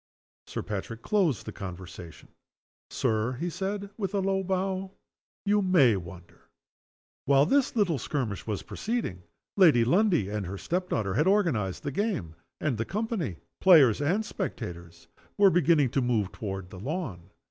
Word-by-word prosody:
Sir - - -4
Patrick 110 +2 -5
closed 180 - +1
the - - -5
conversation: 90 -3 -9 0.6
"Sir," 110 +3 0
he 170 +8 -3
said, 200 +2 -4
with 200 -2 -3
a - - +2
low 195 0 +1
bow, 190 0 -2 0.5
"you 205 +1 +3
may 170 - +5
wonder." 90 -1 -10 0.8
While 140 +1 +5
this 275 - +2
little 180 - +2
skirmish 115 -7 -3
was 105 -3 -3
proceeding 220 - -3 0.4
Lady 155 -12 +6
Lundie 180 - +3
and 105 -2 -3
her 100 +2 -5
step 180 - -2
daughter 95 -3 -1
had 150 - +2
organized 160 - +1
the 145 - -2
game; 140 - -2 0.2
and 135 -8 -1
the - - +1
company, 205 - -3 0.2
players 145 - +6
and 185 +10 +1
spectators, 85 - -6 0.3
were 200 -2 +6
beginning 160 -7 +3
to 135 - +1
move 115 -6 0
toward 95 -3 -6
the 95 - -9
lawn. 110 - -5
140 Hz, 150 wpm, -28 LUFS, -, 0.8 s, Lady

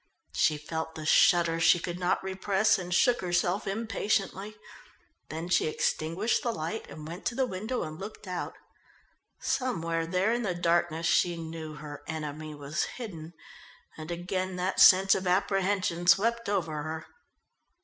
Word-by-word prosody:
She 155 - +2
felt 160 +2 -5
the 155 - -6
shudder 165 0 +4
she 165 +1 +6
could 175 +1 -5
not 180 +1 0
repress 195 +2 +1
and 180 -1 -6
shook 245 +7 +3
herself 175 +2 0
impatiently. 205 -1 -1 0.7
Then 160 +2 -5
she 175 -3 +2
extinguished 165 +7 0
the 235 - -1
light 170 +1 -4
and 150 +1 -9
went 170 +4 -8
to 240 - -2
the 260 0 +2
window 220 +3 -3
and 155 0 -7
looked 205 0 -8
out. 180 -1 -4 0.8
Somewhere 165 -11 -1
there 185 +6 +1
in 240 - 0
the 190 -6 -1
darkness 170 -1 +1
she 175 +1 +2
knew 160 -1 -7
her 150 -1 -8
enemy 155 -1 -5
was 145 +1 -2
hidden, 175 -9 -8 0.6
and 155 +1 -8
again 185 +2 -3
that 180 +1 -1
sense 190 +1 +8
of 190 - -1
apprehension 185 -2 +1
swept 230 +6 +3
over 165 -7 -1
her. 160 +1 -5
175 Hz, 150 wpm, -29 LUFS, 160-195 Hz, 0.8 s, sense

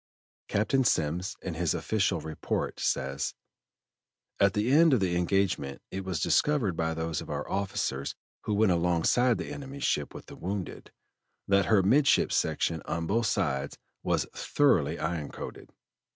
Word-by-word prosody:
Captain 120 +6 +1
Semmes, 90 -1 0
in 90 - -3
his 80 -1 0
official 100 -2 0
report, 80 -1 -3
says: 70 +2 -1 1.0
"At 100 -1 +4
the 105 +4 +1
end 160 +1 +6
of - - +1
the 90 -3 0
engagement 90 -6 0
it 95 0 -4
was 95 -4 -3
discovered 120 - +2
by 80 0 -1
those 80 -1 -2
of - - -10
our - - -3
officers 95 -9 -2 0.3
who 105 - 0
went 105 -2 +4
alongside 90 +8 +2
the - - -5
enemy's 140 0 -7
ship 75 - 0
with - - -9
the - - -11
wounded, 95 +1 -5 0.6
that 100 -1 +3
her 105 -4 +4
midship 135 +9 +4
section 80 -1 0
on 85 0 -2
both 115 +6 +1
sides 70 -8 -1 0.2
was - - 0
thoroughly 130 - +2
iron 80 -2 -3
coated. - - -8
95 Hz, 150 wpm, -29 LUFS, 80-110 Hz, 1.0 s, end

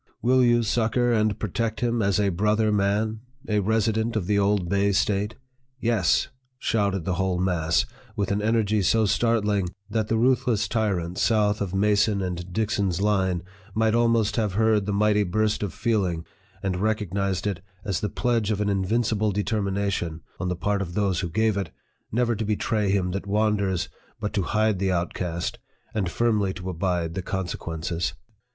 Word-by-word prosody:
" - - -49
Will 130 +1 +4
you 120 -1 +4
succor 120 +2 +1
and 110 -2 +2
protect 110 +2 -2
him 120 -1 +1
as 100 -1 +2
a 100 -1 +2
brother 105 +4 +2
man 105 +2 +1 0.3
a 105 -1 +2
resi 110 +2 +1
dent 110 +2 -1
of 105 -5 0
the 100 +1 +2
old 100 -2 +2
Bay 100 +2 +2
State? 100 +2 0 0.2
" 130 +1 -44
" 130 - -44
YES! 115 -7 +2
" 130 - -45
shouted 100 -7 0
the 95 - 0
whole 95 -1 0
mass, 85 -3 +1 0.3
with 100 -1 -1
an 100 +1 +1
energy 110 -1 +2
so 110 +4 +3
startling, 105 -4 +1 0.2
that 110 -1 0
the 115 - +1
ruth 125 +2 +2
less 110 -3 +1
tyrants 95 -6 -1
south 105 -2 +2
of 95 -2 -2
Mason 105 +1 +3
and 90 -1 -4
Dixon's 100 -3 0
line 95 -4 +1 0.3
might 110 0 +2
almost 115 -2 +2
have 105 -4 0
heard 110 -1 +2
the - - 0
mighty 105 +1 +3
burst 105 +3 0
of 100 -4 -2
feeling, 90 -6 -1 0.4
and 95 -2 -1
recognized 100 -3 -1
it 100 -4 -2 0.2
as 100 -4 -1
the 105 - -2
pledge 115 -4 0
of 105 -2 0
an 105 -1 +1
invincible 105 +2 +1
determina 100 -1 -1
tion, 80 -4 -3 0.2
on 90 +1 -1
the 90 - -1
part 100 +3 -1
of 85 -2 -5
those 100 -4 +1
who 90 - -2
gave 110 +3 +1
it, 95 -4 -2 0.4
never 120 +1 +1
to 110 - -2
betray 105 0 0
him 95 -2 +1
that 100 +2 -4
wanders, 100 -3 +1 0.3
but 105 -1 -3
to 100 - +1
hide 110 +2 +1
the 95 0 +1
outcast, 85 -1 -2 0.3
and 100 -5 0
firmly 105 -3 +1
to 90 +1 -5
abide 85 -2 -1
the 95 - -3
consequences. 85 -4 -3
105 Hz, 185 wpm, -25 LUFS, 95-110 Hz, 0.4 s, Will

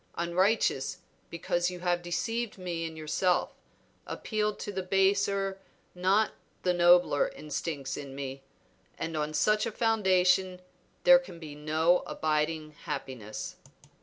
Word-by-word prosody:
Unrighteous, 175 -4 +1 0.3
because 175 +1 -1
you 180 -1 -8
have 175 -1 +1
deceived 220 +7 -2
me 175 -3 -3
in 160 -1 -7
yourself, 165 +4 0 0.5
appealed 210 -1 -2
to 205 - -5
the 190 -1 -3
baser, 195 +1 +1 0.3
not 190 +4 +2 0.3
the 180 - +2
nobler 175 -4 +5
instincts 150 -2 -4
in 140 -2 -7
me, 135 -1 -5 0.6
and 165 0 -4
on 150 0 -1
such 210 +8 +2
a - - -3
foundation 190 -4 +2 0.4
there 265 0 +8
can 190 -10 -11
be 155 -3 -9
no 155 +4 +2
abiding 155 0 -1
happiness." 130 -7 -5
175 Hz, 125 wpm, -29 LUFS, 155-195 Hz, 0.6 s, there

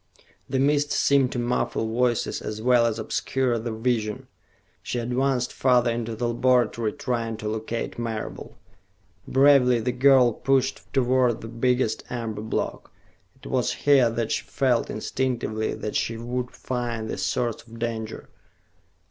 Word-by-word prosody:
The 135 - 0
mist 145 +2 +2
seemed 140 -3 +3
to - - -3
muffle 120 -2 -1
voices 120 0 0
as 105 0 -5
well 120 0 +4
as 115 - -2
obscure 130 -3 -1
the 115 +1 -4
vision. 110 -2 -1 0.6
She - - -4
advanced 125 +1 0
farther 125 -2 +3
into 115 -1 -3
the 120 +2 -1
laboratory, 120 -2 +2
trying 115 -3 -2
to 105 - -5
locate 110 +2 -4
Marable. 115 -2 -5 0.7
Bravely 135 -3 +5
the 120 +3 -1
girl 130 -1 +5
pushed 135 +1 0
toward 130 -2 +2
the 115 - -7
biggest 125 +2 0
amber 115 -3 -4
block. 110 - -3 0.4
It - - -20
was - - 0
here 135 -4 +6
that 115 -1 -2
she - - 0
felt 125 -3 0
instinctively 110 -2 -2
that 105 - -5
she 115 - -1
would 125 +2 -3
find 120 -4 -4
the - - -4
source 120 -2 -1
of 115 0 -14
danger. 115 -1 -4
120 Hz, 145 wpm, -25 LUFS, 115-125 Hz, 0.7 s, here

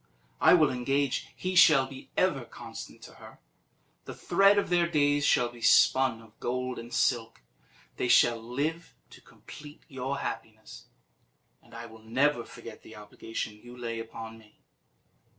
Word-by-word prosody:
I - - +6
will 155 -5 +3
engage 135 +2 -1
he 185 0 -4
shall 155 -7 +6
be 135 0 -12
ever - - +1
constant - - -11
to - - -12
her; - - -13 0.7
the - - -8
thread 195 +1 +3
of 200 - 0
their 175 -1 +2
days 145 -3 +1
shall 120 -1 +3
be 120 -1 -15
spun 125 -1 +3
of 110 0 -21
gold 125 +1 -3
and 115 +1 -10
silk; 115 - -1 0.5
they - - -1
shall 120 -1 +4
live 145 +8 -4 0.2
to - - -15
complete 150 0 -14
your 135 -1 -4
happiness; 110 -4 -8 0.8
and - - -18
I 115 0 -8
will 110 -1 -14
never 120 +3 0
forget 115 -2 -12
the 110 - -14
obligation 105 +1 -7
you 120 0 -13
lay 115 -2 -5
upon 115 0 -9
me." 105 -1 -22
125 Hz, 155 wpm, -28 LUFS, 115-145 Hz, 0.8 s, I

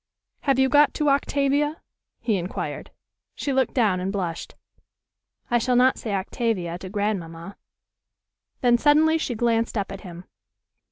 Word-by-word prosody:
"Have 275 -3 +1
you 265 0 +4
got 290 +1 +4
to 300 -2 +1
'Octavia'?" 285 +2 +1 0.4
he 220 - +1
inquired. 180 +1 -5 0.5
She 280 - -2
looked 265 -1 +1
down 210 -8 +2
and 185 +2 -2
blushed. 180 -5 -4 1.0
"I 240 - +4
shall 250 +2 +1
not 255 +1 +4
say 220 - -4
'Octavia' 190 -3 -2
to 185 - -8
grandmamma." 195 -3 -3 1.1
Then 240 -1 +4
suddenly 310 +3 +4
she 250 -6 -2
glanced 230 0 0
up 200 -2 -2
at 195 - -7
him. 175 -2 -10
230 Hz, 145 wpm, -24 LUFS, 190-275 Hz, 1.1 s, you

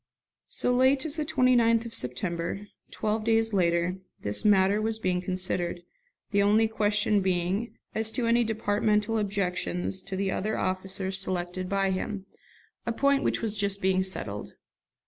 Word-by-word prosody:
So 245 - 0
late 260 +2 +3
as 305 -1 -1
the 305 - -1
29th 240 -4 +3
of 230 - -7
September, 170 - -1 0.2
twelve 215 0 -2
days 225 0 +2
later, 175 -1 +1 0.2
this 105 0 0
matter 200 0 +4
was 220 0 -1
being 185 -4 0
considered, 180 -1 -2 0.5
the 200 -1 +3
only 215 +2 +4
question 210 -1 +2
being 185 +4 -1 0.2
as 220 0 0
to 245 - 0
any 235 +1 +4
departmental 215 0 +1
objections 190 -2 -2
to 195 0 -6
the 190 0 -1
other 215 +3 -1
officers 190 +1 -2
selected 180 -1 -3
by 195 -1 +1
him, 190 +1 -3 0.6
a 235 - -1
point 280 +3 +2
which - - -1
was 220 -2 -2
just 200 -1 0
being 190 -1 +2
settled. 110 - -3
200 Hz, 150 wpm, -27 LUFS, 185-225 Hz, 0.6 s, matter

